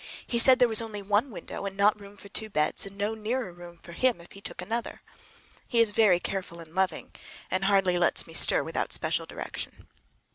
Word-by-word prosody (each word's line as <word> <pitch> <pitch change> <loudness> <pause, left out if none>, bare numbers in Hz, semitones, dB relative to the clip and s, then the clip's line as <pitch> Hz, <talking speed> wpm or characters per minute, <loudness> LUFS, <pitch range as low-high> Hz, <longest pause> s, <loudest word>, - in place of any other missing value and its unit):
He 235 - 0
said 255 +2 +9
there 250 -1 +5
was 225 -1 +2
only 215 -3 -6
one 205 +7 +1
window 210 - -8
and 195 0 -7
not 205 +1 +3
room 200 0 -13
for 200 - -12
two 215 +2 -3
beds, 155 +2 0
and 195 0 -12
no 205 +2 -1
near 220 0 -3
room 175 0 -12
for 170 - -13
him 245 +3 +1
if 170 - -15
he 200 - -13
took - - -7
another. 225 +6 -4 0.6
He 235 - +1
is 230 -2 +4
very 205 -5 +4
careful 180 -2 -5
and 165 -1 -12
loving, 185 -2 -1 0.4
and 185 +1 0
hardly 195 -3 +3
lets 175 - +1
me - - -13
stir - - +3
without - - -3
special - - -1
direction. - - -7
200 Hz, 215 wpm, -28 LUFS, 180-220 Hz, 0.6 s, said